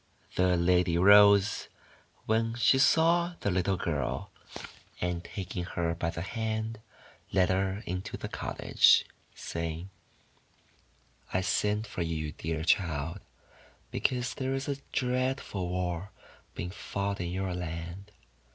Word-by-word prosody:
The 90 -1 +3
lady 90 0 +3
rose 100 +1 +6 0.6
when 115 +1 +1
she 125 +2 +4
saw 170 +4 +4
the 100 - 0
little 95 +1 +1
girl, 70 -8 -2 0.7
and, 90 -1 -2
taking 95 -2 -5
her 85 -2 -1
by 85 0 -2
the 85 0 -4
hand, 110 +1 -3 0.5
led 95 -1 +3
her 95 +3 0
into 90 +2 -4
the - - -5
cottage, - - +3 0.3
saying: 85 +3 -5 0.7
— - - -35 0.4
:<I 95 - +3
sent 105 +3 0
for 105 - -5
you, 80 -2 -2
dear 80 +1 -3
child, 80 0 +1 0.7
because 125 0 0
there 130 0 -2
is 135 0 -3
a 140 -1 -1
dreadful 125 -7 -1
war 90 +1 -2 0.5
being 90 - -4
fought 100 0 -3
in 85 - -2
your 95 +1 -2
land. 90 +3 -6
95 Hz, 125 wpm, -30 LUFS, 85-110 Hz, 0.7 s, rose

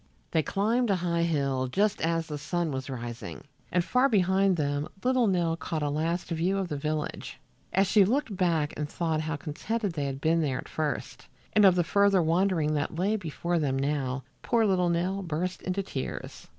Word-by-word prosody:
They 160 - +3
climbed 225 +8 +1
a 195 - +4
high 170 -2 0
hill 140 -6 0
just 200 +10 +1
as 165 0 +1
the 150 -2 -5
sun 165 +2 -1
was 130 0 -4
rising, 120 -2 -6 0.3
and 180 0 +2
far 255 +5 +3
behind 190 -3 +3
them 145 -1 -1 0.2
little 255 -2 +3
Nell 175 -4 +1
caught 160 -2 -3
a 145 - 0
last 165 +4 -1
view 175 +4 +1
of 190 -2 -2
the 150 - -2
village. 150 +1 -3 0.3
As 195 +1 +3
she 200 +1 +5
looked 230 +1 0
back 165 -5 +1
and 150 0 -3
thought 160 -2 -1
how 155 +1 -2
contented 195 +8 -3
they 145 -3 -2
had 135 -1 -4
been 165 +2 +2
there 135 -5 0
at - - -7
first, 155 -2 -4 0.3
and 210 -1 +6
of 185 -2 +7
the 175 - +3
further 200 +1 +3
wandering 165 -2 +2
that 145 +1 -1
lay 200 +5 +1
before 170 -2 -2
them 135 -3 0
now, 135 -2 -1 0.2
poor 230 -2 +2
little 180 -3 +2
Nell 180 +3 0
burst 180 +1 -3
into 185 +2 -2
tears. 135 -8 -6
170 Hz, 195 wpm, -28 LUFS, 150-195 Hz, 0.3 s, of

